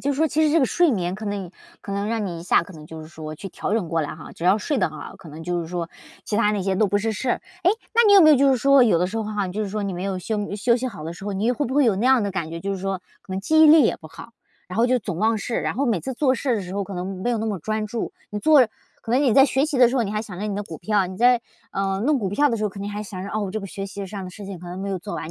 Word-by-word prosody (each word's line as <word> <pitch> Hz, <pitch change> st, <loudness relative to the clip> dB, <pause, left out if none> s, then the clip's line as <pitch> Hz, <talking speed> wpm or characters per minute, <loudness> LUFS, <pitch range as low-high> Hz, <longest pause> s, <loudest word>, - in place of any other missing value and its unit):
就 285 Hz, -, +1 dB
说 305 Hz, +4 st, +2 dB
其 300 Hz, -, 0 dB
实 295 Hz, -, +1 dB
这 330 Hz, -, +4 dB
个 -, -, +4 dB
睡 350 Hz, +7 st, +3 dB
眠 180 Hz, -4 st, -1 dB
可 215 Hz, -, -8 dB
能 205 Hz, 0 st, -2 dB
以 175 Hz, -, -15 dB, 0.3 s
可 -, -, -9 dB
能 200 Hz, +1 st, -2 dB
让 225 Hz, -1 st, -1 dB
你 175 Hz, -4 st, -4 dB
一 -, -, -8 dB
下 -, -, +4 dB
可 200 Hz, -, -12 dB
能 155 Hz, -3 st, -12 dB
就 160 Hz, 0 st, -9 dB
是 155 Hz, -, -11 dB
说 155 Hz, -1 st, -8 dB
去 195 Hz, +5 st, -8 dB
调 190 Hz, -, -4 dB
整 215 Hz, -6 st, 0 dB
过 165 Hz, 0 st, 0 dB
来 145 Hz, -2 st, -4 dB
哈， 160 Hz, -, -11 dB
只 170 Hz, -, -8 dB
要 185 Hz, +3 st, +5 dB
睡 270 Hz, +6 st, -1 dB
得 185 Hz, -, +2 dB
很 155 Hz, -, -10 dB
好， -, -, -9 dB
可 175 Hz, -, -13 dB
能 155 Hz, +2 st, -9 dB
就 175 Hz, +1 st, -1 dB
是 165 Hz, -, -5 dB
说， 170 Hz, 0 st, -4 dB, 0.4 s
其 210 Hz, -, -2 dB
它 210 Hz, -1 st, +3 dB
那 205 Hz, -2 st, -1 dB
些 190 Hz, 0 st, 0 dB
都 215 Hz, -, +3 dB
不 205 Hz, -, +1 dB
是 225 Hz, +2 st, -1 dB
事 240 Hz, +4 st, -2 dB
儿。 -, -, -3 dB, 0.2 s
诶， 360 Hz, -, +6 dB, 0.2 s
那 470 Hz, -, +6 dB
你 410 Hz, -, +6 dB
有 400 Hz, -, +9 dB
没 310 Hz, -3 st, +8 dB
有 300 Hz, -, +7 dB
就 275 Hz, +1 st, +4 dB
是 -, -, +2 dB
说， 275 Hz, +2 st, +5 dB
有 205 Hz, -8 st, +3 dB
的 180 Hz, -, +1 dB
时 215 Hz, -, -5 dB
候 220 Hz, -, -1 dB
哈， 210 Hz, -2 st, -2 dB
你 180 Hz, -, -6 dB
就 215 Hz, +3 st, -2 dB
是 -, -, -4 dB
说 210 Hz, +1 st, -3 dB
你 200 Hz, -1 st, -2 dB
没 180 Hz, +1 st, -4 dB
有 195 Hz, -1 st, -2 dB
休 205 Hz, +2 st, -3 dB
休 235 Hz, +3 st, +2 dB
息 255 Hz, +1 st, -3 dB
好 205 Hz, -11 st, -7 dB
的 160 Hz, +2 st, -5 dB
时 180 Hz, +3 st, -11 dB
候， 205 Hz, -, -3 dB
你 205 Hz, +5 st, 0 dB
会 250 Hz, +4 st, -1 dB
不 260 Hz, -, -4 dB
会 290 Hz, 0 st, +4 dB
有 220 Hz, -5 st, +3 dB
那 220 Hz, +6 st, 0 dB
样 260 Hz, -3 st, +5 dB
的 200 Hz, -, -1 dB
感 185 Hz, -4 st, -3 dB
觉， 165 Hz, 0 st, -6 dB
就 200 Hz, -, -3 dB
是 195 Hz, -, -2 dB
说， 195 Hz, -1 st, -2 dB, 0.2 s
可 190 Hz, -, -9 dB
能 190 Hz, -, -2 dB
记 315 Hz, +10 st, +3 dB
忆 315 Hz, -, +9 dB
力 310 Hz, 0 st, +8 dB
也 230 Hz, -, +2 dB
不 160 Hz, -, -13 dB
好， 165 Hz, +8 st, -12 dB, 0.4 s
然 180 Hz, -, -6 dB
后 230 Hz, +2 st, +4 dB
就 255 Hz, +1 st, +3 dB
总 195 Hz, -5 st, -4 dB
忘 220 Hz, +3 st, +2 dB
事， 220 Hz, +3 st, -3 dB
然 -, -, -2 dB
后 280 Hz, +2 st, 0 dB
每 225 Hz, -6 st, +1 dB
次 265 Hz, -, -4 dB
做 260 Hz, 0 st, +2 dB
事 255 Hz, 0 st, 0 dB
的 210 Hz, -, -2 dB
时 180 Hz, 0 st, -8 dB
候 200 Hz, 0 st, -1 dB
可 195 Hz, -, -8 dB
能 185 Hz, +1 st, -5 dB
没 245 Hz, -, 0 dB
有 235 Hz, -, 0 dB
那 220 Hz, -, -2 dB
么 205 Hz, -3 st, -2 dB
专 215 Hz, +5 st, -2 dB
注。 225 Hz, +1 st, -4 dB, 0.2 s
你 210 Hz, -, -3 dB
做 300 Hz, +6 st, +6 dB, 0.4 s
可 -, -, -7 dB
能 250 Hz, +3 st, +3 dB
你 255 Hz, -6 st, +3 dB
在 270 Hz, -, +8 dB
学 270 Hz, 0 st, +1 dB
习 300 Hz, -, -2 dB
的 250 Hz, -1 st, +6 dB
时 255 Hz, -, -1 dB
候， 245 Hz, -, +3 dB
你 205 Hz, -, -4 dB
还 215 Hz, 0 st, -1 dB
想 190 Hz, -5 st, -9 dB
着 210 Hz, -, -3 dB
你 205 Hz, -, -2 dB
的 205 Hz, -, -2 dB
股 165 Hz, -6 st, -9 dB
票， 200 Hz, +1 st, +1 dB
你 185 Hz, +1 st, -8 dB
在， 245 Hz, +2 st, +4 dB, 0.3 s
呃， 195 Hz, 0 st, -1 dB
弄 300 Hz, +2 st, +3 dB
股 200 Hz, -5 st, -2 dB
票 285 Hz, +10 st, +2 dB
的 230 Hz, -, 0 dB
时 215 Hz, -, -4 dB
候， 210 Hz, -, +1 dB
可 200 Hz, -, -11 dB
能 200 Hz, -, -4 dB
还 205 Hz, 0 st, -4 dB
想 195 Hz, -3 st, -7 dB
着， 200 Hz, -, -6 dB
哦， 215 Hz, -, -2 dB
我 195 Hz, -, -4 dB
这 215 Hz, -, -3 dB
个 195 Hz, -, -6 dB
学 195 Hz, 0 st, -6 dB
习 200 Hz, 0 st, -6 dB
上 195 Hz, 0 st, -6 dB
的 185 Hz, -, -7 dB
事 205 Hz, +3 st, -10 dB
情 195 Hz, -2 st, -7 dB
可 175 Hz, +1 st, -10 dB
能 180 Hz, +1 st, -6 dB
没 195 Hz, +1 st, -4 dB
有 195 Hz, -1 st, -2 dB
做 200 Hz, +3 st, -6 dB
完。 160 Hz, -, -6 dB
205 Hz, 400 characters per minute, -23 LUFS, 185-240 Hz, 0.4 s, 有